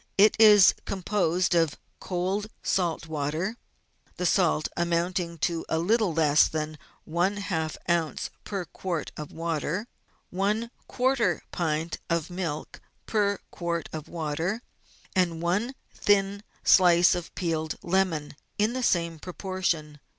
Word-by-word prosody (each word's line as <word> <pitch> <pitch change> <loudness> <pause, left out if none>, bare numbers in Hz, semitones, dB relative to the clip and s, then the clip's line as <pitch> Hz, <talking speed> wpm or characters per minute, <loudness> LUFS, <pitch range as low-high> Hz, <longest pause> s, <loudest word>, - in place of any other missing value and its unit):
It 210 +2 +6
is 210 -4 +8
composed 185 -2 0
of 165 -4 +2 0.2
cold, 190 +3 -2 0.2
salt 175 -3 0
water 160 +7 -2 0.6
(the 180 - -2
salt 170 -5 +3
amounting 170 0 0
to 170 -2 -2
a 160 - +1
little 210 +3 +2
less 155 -2 +4
than 155 -1 -4 0.3
one 175 +5 0
half 160 -6 -2
oz. 170 -3 0
per 195 -3 -4
quart 170 -1 -4
of 150 -1 -7
water), 165 +4 -2 0.5
one 210 +5 0 0.2
quarter 245 -8 +1
pint 160 -1 -1
of 170 0 -1
milk 175 -5 -4 0.2
per 205 -2 +1
quart 170 -1 -3
of 155 -1 -6
water, 165 +7 -2 0.5
and 175 -3 +2
one 205 +10 0 0.2
thin 200 0 +2 0.2
slice 175 -1 +6
of 175 -2 -4
peeled 160 -3 -1
lemon 170 -5 0 0.2
in 215 +3 +2
the 255 - -2
same 170 -8 +1
proportion. 175 -4 -3
175 Hz, 125 wpm, -27 LUFS, 160-195 Hz, 0.6 s, is